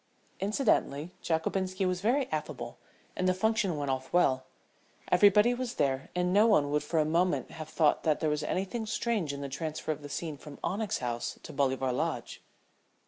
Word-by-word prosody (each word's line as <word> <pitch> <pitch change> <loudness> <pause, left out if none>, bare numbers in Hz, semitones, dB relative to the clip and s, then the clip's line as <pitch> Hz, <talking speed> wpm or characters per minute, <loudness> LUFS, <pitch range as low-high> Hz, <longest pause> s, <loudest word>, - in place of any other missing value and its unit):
Incidentally, 195 - +1
Jockobinski 185 +4 -1
was 180 -1 0
very 255 +6 +2
affable 150 -6 -4 0.4
and 185 0 +1
the 185 - +2
function 200 -4 +1
went 140 -2 -1
off 130 0 -3
well. 130 -7 +3 0.7
Everybody 210 +5 +6
was 245 -1 -4
there 135 -1 0
and 180 0 +1
no 210 +3 +6
one 150 -10 +3
would 150 0 +2
for 150 +3 -2
a 155 - +3
moment 175 +4 +1
have 155 -1 -8
thought 155 -1 +3
that 155 -2 +1
there 160 - 0
was 150 0 0
anything 195 +8 -2
strange 215 -7 0
in 140 0 -6
the 140 - -3
transfer 155 +3 -3
of 155 -1 -4
the 145 - -8
scene 150 +1 -4
from 145 0 -11
Onyx 210 +1 -1
House 120 -2 -3
to 155 - -9
Bolivar 135 -2 +1
Lodge. 125 - -3
160 Hz, 185 wpm, -30 LUFS, 145-195 Hz, 0.7 s, Everybody